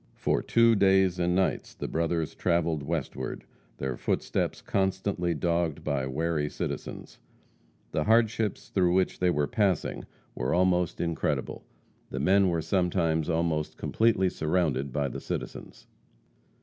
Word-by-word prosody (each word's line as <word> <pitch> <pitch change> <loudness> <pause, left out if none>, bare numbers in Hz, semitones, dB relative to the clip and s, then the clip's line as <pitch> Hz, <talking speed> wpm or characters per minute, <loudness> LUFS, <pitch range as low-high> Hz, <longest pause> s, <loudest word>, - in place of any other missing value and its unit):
For - - 0
two 115 0 +4
days 95 -3 +3
and 90 0 +1
nights 95 0 0
the - - -4
brothers 80 -1 -1
travelled 85 -3 0
westward, 70 -4 -4 0.3
their 65 -2 -3
footsteps - - -1
constantly 95 -2 -1
dogged 85 0 -1
by 70 -3 -1
wary 75 +2 -1
citizens. - - -6 0.7
The 75 - 0
hardships 110 -2 +2
through 90 -2 +2
which 95 0 +1
they 90 - +3
were 75 -4 +1
passing 95 -1 0 0.3
were 65 +6 -1
almost 90 -1 +2
incredible. 85 -2 -2 0.4
The 65 - -4
men 95 +6 +4
were 85 -2 -1
sometimes 85 -2 +1
almost 80 -2 -1
completely 110 -5 +2
surrounded 75 -5 0
by 70 +1 0
the - - -6
citizens. - - -6
85 Hz, 130 wpm, -28 LUFS, 75-95 Hz, 0.7 s, two